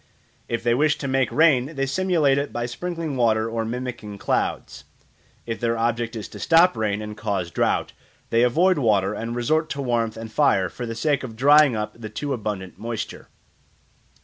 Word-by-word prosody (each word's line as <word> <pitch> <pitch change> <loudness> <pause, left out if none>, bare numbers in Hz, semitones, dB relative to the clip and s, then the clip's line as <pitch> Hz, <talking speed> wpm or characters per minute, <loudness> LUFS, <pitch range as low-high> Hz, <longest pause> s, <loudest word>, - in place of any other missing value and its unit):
If 115 -1 -2
they 120 0 +3
wish 150 +4 +2
to 140 - -4
make 130 -2 +1
rain 155 -2 +3
they 135 0 0
simulate 150 -3 +2
it 140 - -3
by 120 0 -3
sprinkling 165 +4 -4
water 110 -2 +2
or 115 0 -2
mimicking 120 -3 -5
clouds: - - -2 0.6
if 115 -1 -4
their 115 -1 0
object 115 0 -1
is 110 - -5
to - - -10
stop 170 -1 +4
rain 105 -1 -1
and 105 0 -7
cause 100 -5 -3
drought, - - 0 0.4
they 115 - +3
avoid 170 +9 +3
water 105 -5 +2
and 115 +2 -4
resort 155 +7 0
to 140 - -3
warmth 115 -3 -1
and 110 0 -7
fire 95 -3 +2
for 120 +9 -6
the 115 - -5
sake 140 +3 0
of 115 -4 -7
drying 145 +1 +5
up 105 0 -3
the 110 - -6
too 140 +6 -3
abundant 105 -6 -5
moisture. 115 0 -5
120 Hz, 185 wpm, -23 LUFS, 110-140 Hz, 0.6 s, drying